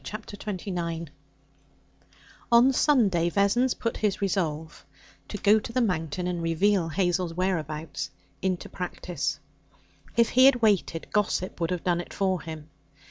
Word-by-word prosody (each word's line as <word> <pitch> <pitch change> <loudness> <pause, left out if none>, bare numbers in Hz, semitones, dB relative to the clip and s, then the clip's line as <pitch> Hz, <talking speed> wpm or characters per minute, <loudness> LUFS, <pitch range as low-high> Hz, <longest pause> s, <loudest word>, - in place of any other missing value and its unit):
Chapter 215 -1 -7
29 175 -6 -4 1.4
On 240 +3 +6
Sunday 205 - +3
Vessons 205 +7 +2
put 230 - -3
his 210 -3 0
resolve 165 -5 -2 0.4
to 205 - -5
go 210 +2 +4
to 215 - -7
the 255 - 0
Mountain 180 - -1
and 180 -1 -2
reveal 165 +2 +2
Hazel's 175 0 0
whereabouts 155 -5 -2 0.3
into 185 -2 -1
practice. 175 -4 -4 0.8
If 235 -1 +4
he 255 +1 +5
had 270 -2 +6
waited, 195 -6 +2
gossip 190 -3 0
would 165 - +1
have 180 -2 -2
done 175 -1 +1
it - - -11
for 190 -3 0
him. 160 -1 -9
180 Hz, 135 wpm, -27 LUFS, 165-210 Hz, 1.4 s, On